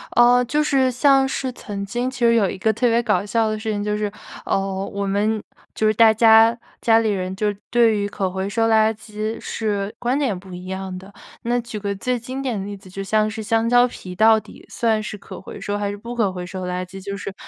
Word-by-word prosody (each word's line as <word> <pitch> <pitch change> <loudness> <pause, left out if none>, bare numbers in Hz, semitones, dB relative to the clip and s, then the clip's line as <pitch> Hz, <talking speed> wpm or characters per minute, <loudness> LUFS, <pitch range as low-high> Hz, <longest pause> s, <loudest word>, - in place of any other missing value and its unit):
哦， 245 +1 +6
就 300 +5 +1
是 270 -3 +2
像 270 +1 +4
是 265 -1 -3
曾 200 -4 -6
经 240 +6 -2
其 260 - -9
实 235 -1 +4
有 205 -5 +3
一 - - -5
个 220 +4 +2
特 240 +3 +1
别 230 +1 +3
搞 205 -4 +1
笑 225 +1 +1
的 215 0 -3
事 220 0 -3
情 205 -1 -2
就 210 0 -1
是， 210 -1 -2 0.3
呃， - - +1 0.3
我 200 0 -3
们 205 +2 0 0.3
就 220 - 0
是 215 - +4
大 220 0 +6
家 225 +1 +6 0.2
家 225 -1 +5
里 225 -1 +1
人 185 -2 -2
就 210 +1 0 0.2
对 230 -2 +4
于 205 0 -1
可 195 -2 -2
回 190 +1 -3
收 225 +2 +1
垃 220 0 +4
圾 215 0 -5
是 205 -2 -3
观 245 +3 0
点 250 -10 0
不 185 -1 -12
一 180 +1 -8
样 190 0 -5
的。 190 +2 -12 0.3
那 240 +1 +1
举 235 -2 -6
个 200 0 -2
最 250 +5 -1
经 255 +3 -6
典 255 -5 -2
的 195 - -5
例 205 0 -6
子， 190 -1 -16
就 195 +2 -6
像 215 +2 +1
是 220 0 -6
香 225 +1 +1
蕉 245 +1 +5
皮 180 -6 -9
到 220 +1 +5
底 - - -15
算 220 -2 0
是 210 - -6
可 190 -1 -10
回 - - -9
收， 205 0 -3
还 205 -1 -2
是 205 - -5
不 235 +4 -7
可 210 -5 +1
回 180 -1 -6
收 185 0 -6
垃 180 0 -3
圾 190 +1 -10
就 200 0 -5
是 200 - -6
215 Hz, 270 characters per minute, -21 LUFS, 200-235 Hz, 0.3 s, 哦